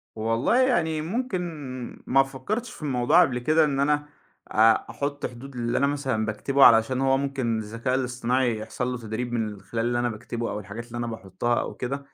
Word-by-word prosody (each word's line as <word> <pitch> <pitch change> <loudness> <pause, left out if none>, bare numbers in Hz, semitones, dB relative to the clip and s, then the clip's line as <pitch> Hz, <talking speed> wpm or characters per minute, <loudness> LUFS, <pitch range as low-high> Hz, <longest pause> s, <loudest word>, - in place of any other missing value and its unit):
والله 115 - +1
يعني 170 -12 +2
ممكن 210 +4 -2 0.7
ما 135 +1 +5
فكرتش 170 - -4
في - - -13
الموضوع 140 +3 +4
قبل 125 -7 +2
كده، 155 +6 +3
إن 140 -2 -1
أنا 145 +1 +2 0.5
أ 110 +1 +6 0.2
أحط 145 0 -3
حدود 130 +2 -8
للي 120 0 -1
أنا 140 - +3
مثلًا 135 -6 -1
باكتبه 135 +6 +2
علشان 115 +3 +5
هو 135 0 +3
ممكن 135 -4 -1
الذكاء 115 +4 -2
الاصطناعي 125 -1 0
يحصل 110 +3 -4
له 125 - -3
تدريب 120 +1 -4
من 115 -2 0
ال 105 -2 -8
خلال 115 +3 -3
اللي 120 0 +1
أنا 120 0 +1
باكتبه 115 +1 -4
أو 105 - -3
الحاجات 105 +4 -8
اللي 120 - -7
أنا 120 0 -2
باحطها 115 +1 -2
أو - - -4
كده؛ 135 +3 -2
125 Hz, 195 wpm, -25 LUFS, 115-140 Hz, 0.7 s, أ